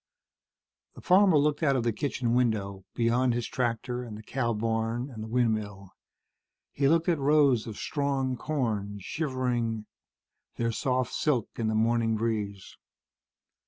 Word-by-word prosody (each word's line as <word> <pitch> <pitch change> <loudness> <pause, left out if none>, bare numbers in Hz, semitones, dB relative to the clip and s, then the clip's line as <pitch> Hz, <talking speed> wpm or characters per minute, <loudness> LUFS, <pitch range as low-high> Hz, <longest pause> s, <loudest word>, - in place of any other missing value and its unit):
The - - -11
farmer 185 -2 +5
looked 145 +1 +2
out 140 -4 +3
of 125 - 0
the 115 -1 +1
kitchen 120 0 -1
window, 100 -6 0
beyond 120 +1 +2
his 120 -1 -2
tractor 125 0 -2
and 110 -3 -8
the 110 - -11
cow 120 +1 -1
barn 115 +3 -1
and 110 -3 -8
the 110 - -5
windmill. 110 -5 -1 0.8
He 140 0 +1
looked 165 +2 +3
at 170 -4 +2
rows 140 -5 +3
of 110 - -7
strong 140 -3 -1
corn, 110 -8 -2
shivering 120 - -2 0.7
their 115 -1 0
soft 125 +1 -1
silk 130 -8 0
in 115 - -1
the 110 - 0
morning 115 0 +2
breeze. 105 -3 -3
120 Hz, 145 wpm, -28 LUFS, 110-135 Hz, 0.8 s, farmer